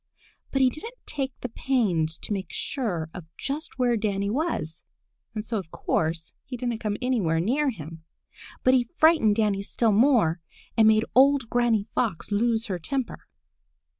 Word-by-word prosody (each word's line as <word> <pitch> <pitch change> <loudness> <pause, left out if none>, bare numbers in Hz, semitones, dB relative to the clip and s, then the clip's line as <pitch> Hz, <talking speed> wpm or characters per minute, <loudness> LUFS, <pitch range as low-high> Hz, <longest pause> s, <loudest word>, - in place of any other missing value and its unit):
But 270 -1 +2
he 255 - +4
didn't 455 - -8
take 270 -2 -3
the 250 - -3
pains 185 -12 0
to - - -2
make 195 -1 -3
sure 175 - -3
of 180 - -8
just 285 +2 -5
where 245 -2 +2
Danny 200 -2 -1
was, 250 - -2 0.5
and 215 0 -3
so 225 -1 -1
of 180 -4 -9
course 160 0 -2
he 250 - -7
didn't 240 -2 -2
come 210 -2 -2
anywhere 205 -11 +1
near 270 - +1
him. 165 - -8 0.6
But 255 - +5
he 245 -2 +2
frightened 315 -10 +5
Danny 210 -3 +1
still 220 +3 +1
more 210 - +3 0.3
and 220 -1 +5
made 220 0 +4
old 270 -2 +4
Granny 235 -4 +2
Fox 215 -5 -1
lose 225 +2 +1
her 190 -6 -3
temper. 265 - -4
225 Hz, 165 wpm, -26 LUFS, 195-255 Hz, 0.6 s, But